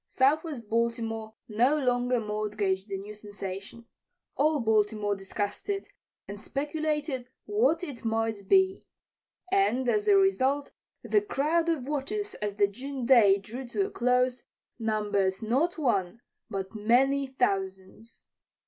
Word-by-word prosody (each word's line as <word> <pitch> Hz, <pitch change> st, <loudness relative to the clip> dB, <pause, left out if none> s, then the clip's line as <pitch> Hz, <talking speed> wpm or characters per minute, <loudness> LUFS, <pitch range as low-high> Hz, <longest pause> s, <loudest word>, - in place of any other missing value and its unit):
Southwest 280 Hz, -3 st, +1 dB
Baltimore 225 Hz, -1 st, -1 dB
no 245 Hz, +7 st, +3 dB
longer 245 Hz, -2 st, +1 dB
mortgaged 210 Hz, -2 st, -2 dB
the 195 Hz, -, -2 dB
new 205 Hz, +2 st, -8 dB
sensation. 205 Hz, +1 st, -8 dB, 0.5 s
All 300 Hz, +1 st, +2 dB
Baltimore 210 Hz, -2 st, +1 dB
discussed 205 Hz, -, -4 dB
it 395 Hz, -1 st, -2 dB, 0.4 s
and 205 Hz, +1 st, -7 dB
speculated 295 Hz, -2 st, -2 dB, 0.2 s
what 415 Hz, -5 st, +2 dB
it 280 Hz, -8 st, -7 dB
might 225 Hz, -3 st, -1 dB
be. 380 Hz, 0 st, +4 dB, 0.7 s
And, 320 Hz, -11 st, +2 dB
as 420 Hz, -, +1 dB
a 405 Hz, -1 st, +6 dB
result, 285 Hz, -8 st, +2 dB, 0.3 s
the 420 Hz, -, +2 dB
crowd 335 Hz, -3 st, 0 dB
of 290 Hz, -6 st, -1 dB
watchers 395 Hz, +9 st, -3 dB
as 205 Hz, -1 st, -2 dB
the 205 Hz, 0 st, +4 dB
June 255 Hz, +5 st, -5 dB
day 225 Hz, -6 st, +6 dB
drew 240 Hz, +6 st, -8 dB
to 390 Hz, +11 st, 0 dB
a 405 Hz, -, -6 dB
close 250 Hz, +1 st, +1 dB, 0.4 s
numbered 205 Hz, -4 st, 0 dB
not 270 Hz, +11 st, 0 dB
one, 230 Hz, -, 0 dB, 0.3 s
but 195 Hz, 0 st, -4 dB
many, 260 Hz, +6 st, +2 dB
thousands. 195 Hz, -3 st, -3 dB
240 Hz, 130 wpm, -28 LUFS, 210-295 Hz, 0.7 s, a